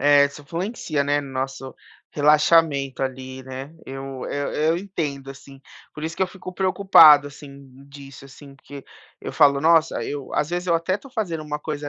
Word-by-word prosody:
É, 145 +1 +5
isso 145 +1 -12
influencia, 165 - -3
né, 145 +1 +1
no 140 -2 -10
nosso 135 0 -5 0.4
relaxamento 150 -2 +2
ali, 130 0 -6
né. 130 +4 -9
Eu 135 -1 -7
eu 145 0 -3
eu 160 +2 +1
entendo, 155 -8 -5
assim, 135 0 -14 0.3
por 150 - -7
isso 165 +1 -5
que - - 0
eu - - +1
fico 185 -1 -10
preocupado, 185 -7 +6
assim, 140 -1 -14 0.2
disso, 140 -1 -13
assim, 140 +1 -14
porque 140 0 -12 0.4
eu - - -7
falo: 140 -1 +4
"Nossa, 165 +1 +3
eu" 145 -2 -6
Às 150 +2 -1
vezes 175 +1 -3
eu 170 - +3
até 170 +3 -2
estou 210 +7 -8
fazendo 190 -10 -3
uma 150 -1 -5
coisa 150 -1 -5
145 Hz, 180 wpm, -22 LUFS, 135-165 Hz, 0.4 s, preocupado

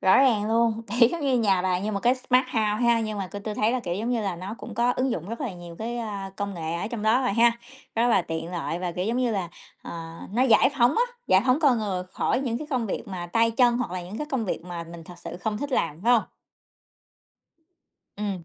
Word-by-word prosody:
Rõ 190 - +5
ràng 225 -6 +3
luôn, 230 0 +2
thì 240 -1 +5
giống 335 +4 -4
như 265 -3 +2
nhà 195 -5 +2
bà 180 -1 +1
như 210 +3 -2
một 200 - -2
cái 245 +2 +4
smart 255 0 +2
house 240 -3 -1 0.2
ha, 235 -1 +4
nhưng 215 -2 -3
mà 190 -2 -3
tôi 205 - -6
tôi 215 - -3
thấy 215 +2 +2
là, 255 - 0
kiểu, 175 -5 -3
giống 225 +5 -2
như 235 -2 +1
là, 195 -4 -2
nó 185 +5 -6
cũng 230 - -8
có 240 +2 +2
ứng 260 0 +1
dụng 175 -2 -3
rất 230 - -5
là 250 -9 -2
nhiều 175 -1 -10
cái, 235 +2 -3
a, 200 -4 -4
công 200 -1 -3
nghệ 165 -1 -3
ở 170 - -2
trong 230 -3 -4
đó 225 +4 +4
rồi 250 - +1
ha, 235 +2 +5 0.4
rất 230 +2 +3
là 230 - +4
tiện 165 +1 -4
lợi 170 0 -3
và, 180 -1 -3
kiểu, 180 - -2
giống 230 +4 0
như 250 -2 +1
là, 190 -5 -2 0.3
ờ, 165 -1 -7 0.2
nó 245 +4 +2
giải 260 +2 +5
phóng 240 +4 +4
á, 475 - +4 0.2
giải 190 +2 +5
phóng 255 +5 +3
con 265 -6 +4
người 190 -4 -2
khỏi 255 - 0
những 240 -4 -2
cái 305 - -6
công 245 -4 0
việc 200 - -4
mà 180 -3 -5
tay 230 +6 +2
chân 240 +1 +3
hoặc 245 - -2
là 180 0 -4
những 190 +5 -7
cái 300 - -3
công 250 -5 0
việc 175 - -3
mà 175 -2 -6
mình 165 0 -10
thực 175 +2 -12
sự - - -7
không 210 +4 -2
thích 285 +2 -4
làm, 165 -9 0
phải 245 - +5
hông? 230 - +5 1.9
Ừm. 200 -4 -3
215 Hz, 270 wpm, -26 LUFS, 185-240 Hz, 1.9 s, Rõ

